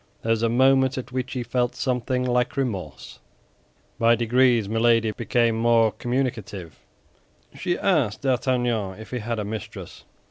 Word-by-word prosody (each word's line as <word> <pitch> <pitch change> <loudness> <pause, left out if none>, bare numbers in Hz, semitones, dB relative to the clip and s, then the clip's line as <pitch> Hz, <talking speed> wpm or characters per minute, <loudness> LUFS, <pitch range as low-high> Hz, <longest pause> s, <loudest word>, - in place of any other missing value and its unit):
There 115 - 0
was 115 -1 +1
a 115 - +2
moment 130 +2 +3
at 130 - -6
which 130 0 -3
he 125 -2 -3
felt 125 0 -1
something 125 0 -1
like 125 +1 0
remorse. 95 - -4 0.8
By 115 +1 +5
degrees, 120 -1 +2
Milady 115 0 +2
became 115 +1 +1
more 115 -1 +3
communicative. 110 - -4 0.7
She 175 -2 -2
asked 140 - 0
D'Artagnan 120 -6 0
if 110 - -11
he 125 - -2
had 115 +1 -3
a 105 - -3
mistress. 110 0 -8
120 Hz, 145 wpm, -24 LUFS, 110-125 Hz, 0.8 s, By